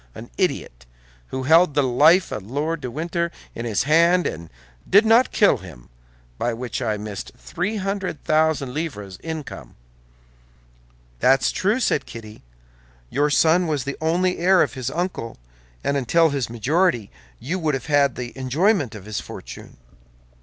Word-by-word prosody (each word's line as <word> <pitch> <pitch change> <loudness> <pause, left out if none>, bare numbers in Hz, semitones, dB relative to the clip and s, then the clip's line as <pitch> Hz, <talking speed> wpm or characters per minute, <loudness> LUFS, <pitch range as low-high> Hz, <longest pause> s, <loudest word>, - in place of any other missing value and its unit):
An - - -10
idiot, - - -2 0.4
who 130 - -4
held 160 +2 +4
the 145 - +3
life 150 +8 +4
of - - -4
Lord 150 +4 -2
de 125 - -4
Winter 170 +5 -2 0.2
in 115 - -6
his 110 -4 0
hands 170 +4 +4
and 80 0 -6 0.4
did 205 +3 +6
not 230 +3 +4
kill 205 - +4
him, 75 -10 -13 0.5
by 120 -1 -1
which 125 +2 -5
I 110 -3 -1
missed 105 -2 -7
three 185 +5 -3
hundred 195 -5 -3
thousand 155 -4 +1
livres' 105 - -5
income." 150 - -7 1.4
"That's 135 - +3
true," 210 +6 0
said - - 0
Kitty; 110 -2 -10 0.7
"your 145 +1 +1
son 165 +4 +3
was 150 -4 -1
the 140 0 -4
only 180 +3 +1
heir 185 +1 +5
of - - -3
his 130 -1 -4
uncle, 170 -8 -4 0.5
and 140 - 0
until 160 +5 +3
his 135 -5 -2
majority 120 - 0 0.3
you 180 +7 -3
would 155 -4 0
have 130 - -5
had 145 -4 +2
the 120 -1 -6
enjoyment 140 - +1
of 100 -3 -10
his 105 -1 -4
fortune." - - -10
145 Hz, 155 wpm, -22 LUFS, 120-170 Hz, 1.4 s, did